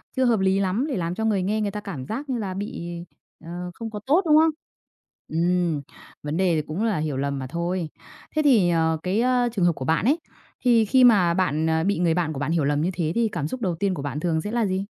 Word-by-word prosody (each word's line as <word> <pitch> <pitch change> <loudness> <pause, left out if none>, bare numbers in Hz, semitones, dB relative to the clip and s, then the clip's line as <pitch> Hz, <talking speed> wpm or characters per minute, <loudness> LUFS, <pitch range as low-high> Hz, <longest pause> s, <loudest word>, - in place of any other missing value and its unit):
chưa 260 - +2
hợp 230 -4 +3
lý 190 0 +2
lắm, 200 +8 0
thì 265 - -2
làm 175 -1 -2
cho 220 - -2
người 205 -4 +1
nghe 215 +3 0
người 205 -1 -1
ta 210 - -5
cảm 145 -11 -6
giác 270 - -5
như 250 - -1
là 190 -3 -3
bị, 190 -3 -5 0.6
ờ, 175 +1 -6
không 225 +3 -6
có 210 - -5
tốt, 310 +8 +4
đúng 305 -1 +5
không? 320 +1 +5 0.8
Ừm, 170 -2 0 0.4
vấn 150 +3 -3
đề 185 -3 +2
thì 155 - +1
cũng 165 +8 -3
là 220 -6 +1
hiểu 150 -3 -2
lầm 140 0 -2
mà 130 - -5
thôi. 170 +2 -2 0.5
Thế 310 - +3
thì, 235 -12 +4
ờ, 160 -1 +2
cái, 195 +5 +1
ờ, 250 -1 +2
trường 185 -5 +1
hợp 170 - +4
của 130 - -5
bạn 160 +6 +1
ấy 290 +7 +3 0.5
thì 230 -3 +5
khi 255 +4 +4
mà 195 -8 +5
bạn, 160 -3 0
ờ, 160 0 +1
bị 200 0 0
người 170 -2 +2
bạn 165 -2 -1
của 135 - -5
bạn 145 +3 -1
hiểu 165 -3 +1
lầm 145 +1 +1
như 170 - +1
thế 160 -2 -1
thì 235 -1 +2
cảm 150 -4 -2
xúc 255 +9 -6
đầu 185 -6 -1
tiên 190 +3 0
của 145 - -5
bạn 145 0 -4
thường 160 -1 0
sẽ 210 - -5
là 235 -2 +1
gì? 190 +1 -1
180 Hz, 270 wpm, -24 LUFS, 160-220 Hz, 0.8 s, đúng